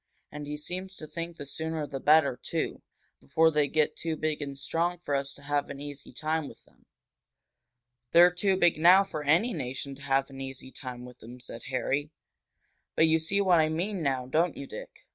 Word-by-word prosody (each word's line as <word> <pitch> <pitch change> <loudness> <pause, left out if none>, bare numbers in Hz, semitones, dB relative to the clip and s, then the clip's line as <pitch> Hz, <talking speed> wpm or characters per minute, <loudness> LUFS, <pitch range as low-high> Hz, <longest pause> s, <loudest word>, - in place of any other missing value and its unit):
And 150 -1 -7
he 150 0 -4
seems 185 +5 -5
to 155 - -8
think 170 +2 -6
the 145 - -7
sooner 160 +2 -3
the 135 -1 -5
better, 145 -2 +5
too, - - -3 0.4
before 160 - +3
they 150 -2 +2
get 155 +1 +1
too 165 -1 -3
big 155 -1 -1
and 140 -1 -5
strong 165 +5 -1
for 165 -4 -4
us 140 0 0
to 140 - -14
have 145 0 -1
an 140 - -7
easy 145 -1 -8
time 155 -1 -2
with - - -14
them." - - -28 1.2
"They're 175 +6 +7
too 190 +2 +1
big 175 -4 +3
now 180 +4 +7
for 155 -6 -5
any 175 +12 +3
nation 135 -2 -4
to 135 - -13
have 135 0 +1
an 135 0 -8
easy 135 -1 -7
time 125 -3 -7
with 125 0 -13
them," 120 +3 -11
said 120 -1 -9
Harry. 135 +2 -1 0.9
"But 160 - +5
you 160 0 +3
see 195 +6 +1
what 180 -4 +5
I 155 0 +3
mean 180 +4 -2
now, 135 -4 0
don't 160 +6 +1
you, 140 - -6
Dick? - - -10
150 Hz, 205 wpm, -29 LUFS, 135-165 Hz, 1.2 s, They're